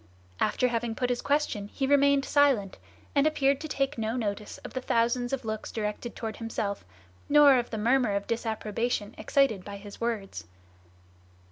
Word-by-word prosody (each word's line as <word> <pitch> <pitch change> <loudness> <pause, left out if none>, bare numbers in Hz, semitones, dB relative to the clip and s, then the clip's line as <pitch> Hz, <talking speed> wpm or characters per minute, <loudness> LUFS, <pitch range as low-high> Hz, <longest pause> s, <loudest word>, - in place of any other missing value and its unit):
After 250 - +2
having 230 -1 -2
put 250 +1 0
his 245 - -1
question 285 -8 0
he 270 - -3
remained 280 0 +4
silent, 265 -10 +2 0.3
and 285 +1 +4
appeared 280 -3 +2
to 315 - -4
take 275 -3 -1
no 220 +1 -1
notice 210 -3 -3
of - - -8
the 255 - -3
thousands 240 0 +1
of 270 -3 -3
looks 220 -1 -4
directed 215 +2 -4
toward 220 -2 -5
himself, 220 -3 -3 0.5
nor 285 -3 +7
of 240 - -4
the 220 - -4
murmur 235 -1 +2
of 200 0 -2
disapprobation 225 -1 -2
excited 270 -9 +2
by 200 +1 -7
his 205 +2 -11
words. 205 - -3
235 Hz, 165 wpm, -28 LUFS, 215-270 Hz, 0.5 s, nor